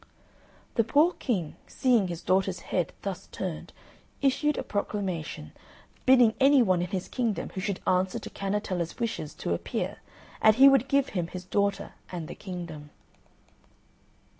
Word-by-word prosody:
The 230 - +3
poor 295 +10 +4
King, 185 - -2
seeing 245 -7 +2
his 170 -2 -6
daughter's 190 -1 +1
head 180 -2 -1
thus 195 -3 -5
turned, 180 -5 -5 0.5
issued 280 +2 +2
a - - -2
proclamation, 185 - -3 0.6
bidding 250 -4 +6
any 270 -1 +6
one 185 -5 +2
in 180 - -1
his 185 0 -3
kingdom 230 -8 -2
who 190 - -4
should 195 -1 -3
answer 185 0 +1
to - - -7
Cannetella's 195 -4 -2
wishes 230 -10 -3
to - - -2
appear, 85 - -3 0.4
and 215 -1 +6
he 270 +3 +8
would 270 -1 +5
give 280 0 +2
him 175 -4 -2
his 180 +1 -8
daughter 200 +1 -1 0.2
and 170 -4 -5
the - - -7
kingdom. 170 -6 -7
195 Hz, 150 wpm, -28 LUFS, 180-240 Hz, 0.6 s, he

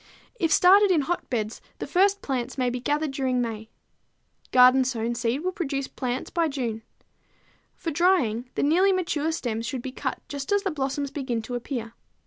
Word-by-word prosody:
If 330 -3 +1
started 395 +3 +6
in 340 -5 +4
hotbeds, 245 -8 -3 0.2
the - - -4
first 395 +2 +2
plants 260 -1 -3
may 250 -2 +1
be 250 - -3
gathered 295 +3 -1
during 260 -2 0
May. 220 -2 -3 0.8
Garden 255 +1 +7
sown 235 -2 -1
seed 235 +3 -1
will 370 - 0
produce 275 -7 -3
plants 250 0 -4
by 335 -1 +1
June. 240 -6 -3 0.9
For 330 - -4
drying, 280 - +2
the - - 0
nearly 355 +7 +4
mature 325 -4 0
stems 235 -7 -3
should 255 -2 -4
be 265 - -5
cut - - -4
just 280 +2 -5
as 405 0 +2
the 385 - -1
blossoms 280 -1 -2
begin 260 -5 -3
to 245 - -7
appear. 240 -2 -4
270 Hz, 175 wpm, -25 LUFS, 245-325 Hz, 0.9 s, Garden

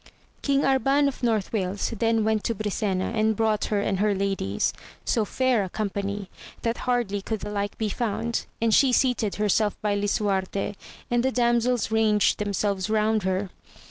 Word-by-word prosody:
King 280 -1 +2
Arban 270 +2 +3
of 275 - -4
North 225 -5 0
Wales 195 0 -1
then 225 -1 +2
went 220 -1 +1
to 230 - 0
Brisena, 200 -2 -1
and 220 0 +2
brought 215 -1 +1
her 205 -2 0
and 195 -2 -1
her 205 0 +2
ladies, 195 - -1 0.3
so 225 -3 +1
fair 255 -2 +1
a 190 - -5
company, 200 0 -3 0.4
that 230 0 0
hardly 225 -5 0
could 220 +1 -4
the 210 - -5
like 205 0 -3
be 220 -1 -1
found, 230 +1 -2
and 230 -1 +2
she 270 +2 +5
seated 245 -5 +1
herself 210 0 +1
by 210 -1 +1
Lisuarte, 200 -1 -1 0.4
and 240 0 +3
the 265 - +2
damsels 240 -2 +1
ranged 220 -2 +3
themselves 200 -1 -1
around 215 0 +2
her. 190 0 -1
215 Hz, 170 wpm, -25 LUFS, 200-230 Hz, 0.4 s, she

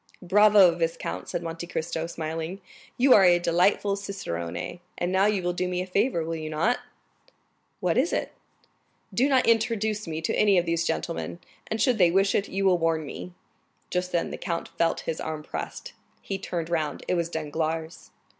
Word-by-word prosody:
"Bravo, 200 -1 +6
viscount," 165 - -3
said 170 - -3
Monte 165 +1 -5
Cristo, 165 -1 -3
smiling; 165 +2 -4 0.4
"you 255 +1 +6
are 200 - +7
a 175 -1 +6
delightful 180 +4 +2
cicerone. 175 - -5 0.2
And 175 +1 -1
now 190 +2 +4
you 205 -3 0
will 175 0 0
do 180 +1 -1
me 180 0 -2
a 180 - -2
favor, 195 -1 +1
will 165 - -3
you 155 -1 -5
not?" 170 +11 +1 1.0
"What - - +2
is - - +1
it?" - - -1 0.8
"Do 265 +4 +3
not 260 -2 +4
introduce 220 -2 +1
me 160 -1 -3
to 160 - -1
any 205 -2 +4
of 175 - +2
these 170 0 0
gentlemen; 165 +1 -3 0.3
and 220 - -3
should 245 -1 +2
they 175 -2 +6
wish 195 +3 +3
it, 200 - 0
you 195 +1 -1
will 180 -2 +4
warn 165 -1 +1
me." 180 +5 -8 0.6
Just 180 0 -1
then 170 - 0
the - - -5
count 170 -3 -3
felt 165 0 0
his 160 - -4
arm 155 -1 -4
pressed. - - -6 0.3
He 195 -1 -4
turned 170 -3 -4
round; 155 -4 -2
it - - +1
was 170 -2 0
Danglars. 160 +1 -3
175 Hz, 185 wpm, -26 LUFS, 165-200 Hz, 1.0 s, are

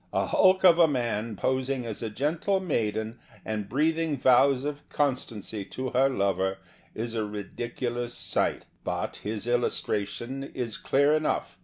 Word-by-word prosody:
A - - +1
hulk 190 0 +4
of 175 -2 +7
a 165 - +7
man 115 -5 -1
posing 130 +3 -1
as 110 -3 -5
a 115 - -2
gentle 155 - 0
maiden 110 - -2 0.3
and 105 -2 -3
breathing 160 +2 +1
vows 130 +1 +4
of 145 0 -5
constancy 115 -7 -2
to 130 +5 -5
her 135 +2 +4
lover 95 -4 0 0.4
is 115 +1 -3
a 110 -2 -1
ridiculous 120 +4 -4
sight. - - 0 0.2
But - - -3
his 105 0 -3
illustra 120 -4 +1
tion 125 +6 -6
is 125 -5 -4
clear 140 +2 +3
enough. 155 0 0
120 Hz, 150 wpm, -27 LUFS, 110-140 Hz, 0.4 s, of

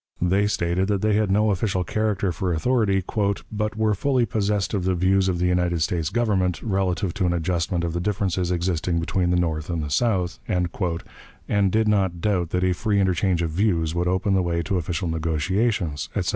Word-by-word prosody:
They 95 +4 +2
stated 90 -1 0
that 100 -1 0
they 110 -1 +3
had 105 -1 +2
no 105 +2 +3
official 95 -1 0
character 100 -1 -1
or 90 -2 +1
authority, 100 +1 +1 0.5
"but 105 0 -2
were 110 -1 +2
fully 125 +4 +1
possessed 105 -2 -1
of 100 -3 0
the 95 0 +1
views 95 +2 +2
of 90 - 0
the 90 - 0
United 90 -2 +1
States 85 -3 -1
Government, 100 -7 0
relative 95 -4 -1
to 95 -2 0
an 85 - +1
adjustment 85 0 -1
of 85 -1 -2
the 85 - -1
differences 95 -3 -1
existing 85 -1 0
between 90 +2 0
the 90 - +2
North 80 -2 -1
and 85 -3 -2
the 75 - -5
South," 95 -4 0
and 90 +3 -2
did 110 +1 +2
not 95 -5 +1
doubt 90 -3 0
that 90 +1 -1
a 90 0 +2
free 100 +3 0
interchange 90 -2 +1
of 80 - -2
views 85 -3 +1
would 85 +1 0
open 95 +2 +1
the 95 - +3
way 85 -1 -1
to 100 0 -1
official 85 +1 -2
negotiations, 80 +1 -1
etc. 95 -4 0
90 Hz, 200 wpm, -23 LUFS, 85-100 Hz, 0.5 s, they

